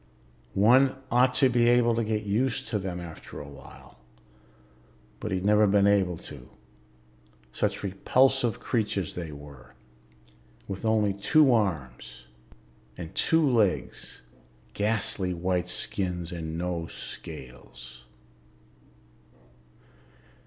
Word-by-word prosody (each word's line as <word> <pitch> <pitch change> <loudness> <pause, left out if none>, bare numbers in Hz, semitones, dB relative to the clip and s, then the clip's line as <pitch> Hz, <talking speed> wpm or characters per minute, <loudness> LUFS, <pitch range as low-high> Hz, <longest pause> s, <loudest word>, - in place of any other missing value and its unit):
One 130 +7 +5 0.2
ought 125 +1 +3
to 135 - +5
be 120 -1 +3
able 120 -1 +4
to 115 0 0
get 110 0 -1
used 125 +6 -1
to 105 - -1
them 95 -2 -4
after 85 -2 -9
a 75 - -8
while, 70 -3 -14 1.2
but 105 - -5
he'd 95 0 -2
never 105 0 +5
been 100 0 +4
able 95 -4 +2
to. - - -11 1.0
Such - - -2
repulsive 120 +4 +2
creatures 105 -6 -1
they 85 -3 -6
were, 70 -4 -13 0.9
with 95 +2 -5
only 110 -2 +2
two 130 +8 +4
arms 80 - -2 0.7
and 80 -2 -8
two 160 -2 +2
legs, 110 - 0 0.5
ghastly 100 -3 0
white 90 0 -1
skins 90 -2 -2
and 80 -2 -5
no 85 -1 -3
scales. 60 0 -9
100 Hz, 110 wpm, -27 LUFS, 85-115 Hz, 1.2 s, One